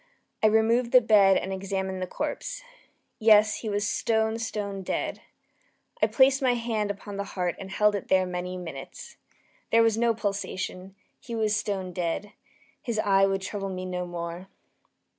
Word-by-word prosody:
I 220 - +6
removed 225 +3 +2
the 255 - +10
bed 205 -4 +5
and 190 - -3
examined 190 -1 -3
the 185 - -2
corpse. - - -4 0.6
Yes, 215 -2 +5
he 220 - -5
was 205 0 0
stone, 220 +1 0
stone 205 -3 -4
dead. 185 - -3 0.8
I - - +5
placed 265 0 +4
my 255 -2 +3
hand 225 -3 -1
upon 200 0 -6
the 200 - -2
heart 180 -2 0
and 190 - -7
held 210 +2 +3
it 200 - -4
there 185 -1 +3
many 180 0 -4
minutes. 165 - -9 0.5
There 230 0 +5
was 225 -1 +2
no 235 -1 +2
pulsation. 195 -2 -4 0.2
He 235 - -7
was 215 -1 +1
stone 190 -3 -3
dead. 180 +4 -3 0.5
His 235 -3 -3
eve 195 -2 +3
would 195 0 -1
trouble 195 0 -4
me 185 -1 -5
no 180 -1 -3
more. 170 +1 -6
200 Hz, 165 wpm, -27 LUFS, 185-220 Hz, 0.8 s, the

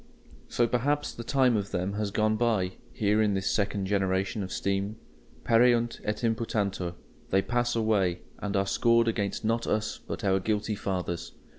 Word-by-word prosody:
So 120 - +2
perhaps 145 +5 0
the 115 - -7
time 130 -1 +3
of 100 -1 -1
them 95 +1 -2
has 105 0 -1
gone 110 +2 +1
by, 110 -6 +1 0.2
here 105 0 +2
in 105 -2 +2
this 95 0 0
second 100 -2 0
generation 95 +1 0
of 95 -1 -5
steam. 100 +2 -1 0.5
Pereunt 120 0 +3
et 105 +3 -3
imputantur; 105 -6 -1 0.3
they 95 0 +3
pass 120 +2 0
away, 100 -6 +1 0.2
and 105 0 -3
are 95 - +2
scored 115 +4 +3
against 105 -1 -1
not 115 +1 0
us 110 0 -1
but - - -5
our 95 -1 +3
guilty 105 +2 -1
fathers. 90 -4 -3
105 Hz, 165 wpm, -28 LUFS, 95-115 Hz, 0.5 s, time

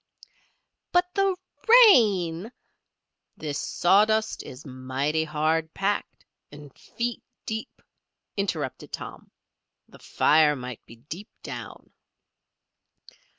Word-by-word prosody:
"But 360 0 +2
the 390 -2 +2 0.5
rain" 205 - +4 0.9
"This 150 -2 -4
sawdust 215 +4 +2
is 125 +5 -11
mighty 135 +4 -2
hard 160 +1 0
packed, 200 +1 -2 0.3
and 145 -2 -12
feet 235 0 -4 0.2
deep," 220 0 -6 0.5
interrupted 160 -10 -3
Tom. - - -8 0.6
"The - - -17
fire 150 -1 +3
might 125 -3 -8
be 115 - -13
deep 155 - -9
down." - - -8
160 Hz, 90 wpm, -26 LUFS, 145-215 Hz, 0.9 s, rain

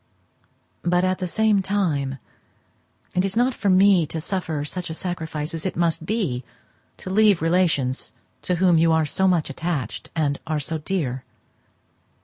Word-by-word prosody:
But, 175 +1 +2
at 185 0 +1
the 185 - -2
same 215 +1 +2
time, 160 -9 -1 1.0
it 180 - +3
is 195 +2 -1
not 250 +2 +3
for 205 - -1
me 185 -3 +5
to 160 - -4
suffer 160 -4 -2
such 180 +3 -4
a 160 - -4
sacrifice 160 -4 -4
as 165 -1 -5
it 185 - -2
must 165 -1 0
be 185 - -1 0.5
to 185 - -7
leave 205 -2 +4
relations 165 -6 +1 0.3
to 180 - 0
whom 175 -2 +4
you 165 0 +4
are 160 -1 +3
so 190 +5 +1
much 175 -6 +1
attached, 150 - -4
and 145 -3 0
are 155 -1 0
so 155 +3 -3
dear. 145 -7 -2
170 Hz, 160 wpm, -23 LUFS, 155-190 Hz, 1.0 s, me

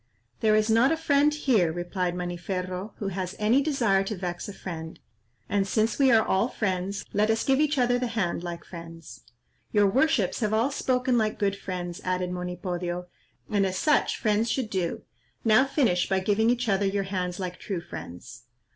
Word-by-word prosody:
"There 215 -1 +3
is 215 0 +3
not 230 +5 +4
a 325 - +1
friend 295 -2 +3
here," 245 - +2
replied 175 +1 -2
Maniferro, 180 +2 -4
"who 200 - -3
has 185 0 -4
any 225 +6 +3
desire 235 -10 +2
to 215 - -3
vex 175 0 -5
a - - -7
friend; 160 -4 -7 0.5
and 200 -1 0
since 220 +5 0
we 270 -2 +5
are 225 -1 +5
all 190 +5 +2
friends, 195 -4 -2
let 210 +2 +2
us 225 0 +2
give 270 0 +2
each 300 -1 +2
other 245 -1 +3
the 250 - -1
hand 205 -8 -1
like 170 -1 -6
friends." 165 -2 -10 0.5
"Your 205 -1 +4
worships 235 - +2
have 215 -2 +1
all 235 +6 +2
spoken 255 -2 +1
like 215 -1 0
good 200 -1 0
friends," 175 -3 -5
added 185 -1 -1
Monipodio, 180 0 -4 0.4
"and 205 -2 +1
as 190 -1 -1
such 300 +6 +2
friends 215 0 +1
should 235 -2 -1
do; 180 -3 -2 0.4
now 225 +4 +5
finish 245 - +1
by 190 -1 +2
giving 210 +4 +2
each 245 0 +1
other 200 -1 +2
your 195 0 0
hands 185 -2 -3
like 180 -1 -5
true 195 -4 -3
friends." 120 - -10
200 Hz, 185 wpm, -27 LUFS, 180-230 Hz, 0.5 s, we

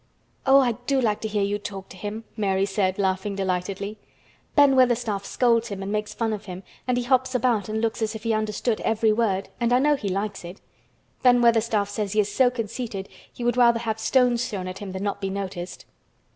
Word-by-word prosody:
"Oh, 270 +1 +7
I 255 -3 +3 0.2
do 275 -1 +2
like 215 -4 0
to 220 - -2
hear 210 -1 0
you 205 +1 -1
talk 195 -2 -7
to - - -11
him!" 210 +4 -6
Mary 195 -2 +1
said, 195 -1 0
laughing 195 0 -1
delightedly. 195 +2 -3 0.6
"Ben 285 -2 +6
Weatherstaff 240 -5 +2
scolds 235 0 +2
him 200 -3 -5
and 195 - -4
makes 210 0 -2
fun 225 -2 -1
of 210 - -6
him, 185 0 -8 0.2
and 250 -1 +1
he 245 - 0
hops 260 +1 +1
about 230 -5 +1
and 220 +1 -1
looks 230 0 -1
as 220 0 -1
if 220 - -7
he 230 -1 +1
understood 215 +1 -1
every 220 -1 +2
word, 205 -4 0
and 235 0 +1
I 245 - +5
know 295 +3 +3
he 210 -8 -4
likes 200 +2 -3
it. 175 +3 -9 0.6
Ben 245 -1 +5
Weatherstaff 225 -3 +3
says 205 -1 -3
he 215 - +2
is 205 0 +1
so 255 +2 +4
conceited 225 -4 -5 0.2
he 245 - -8
would 240 +1 +1
rather 235 -1 +5
have 220 -1 -2
stones 245 +1 +2
thrown 190 -5 -4
at 185 +1 -6
him 200 -2 -6
than 190 +1 -5
not 200 0 -2
be 195 - -1
noticed." 190 -2 -5
215 Hz, 220 wpm, -24 LUFS, 200-240 Hz, 0.6 s, Oh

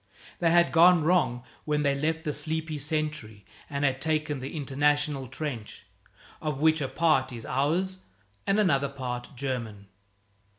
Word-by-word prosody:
They 170 - +3
had 170 +1 +4
gone 170 0 +6
wrong 150 -8 +2 0.2
when 150 -1 0
they 140 -1 +3
left 160 +3 -1
the 150 -3 -2
sleepy 155 +1 -2
sentry 150 -8 -3 0.2
and 140 0 -1
had 135 -1 0
taken 155 -3 0
the 135 +5 -6
International 145 0 0
Trench, 130 -4 -6 0.6
of 150 -3 -2
which 160 +1 +3
a 135 - 0
part 155 -4 +2
is 115 -2 -8
ours 170 +8 0 0.5
and 195 +2 +3
another 140 -9 +2
part 125 -2 -6
German. 115 -7 -4
150 Hz, 145 wpm, -27 LUFS, 130-160 Hz, 0.6 s, gone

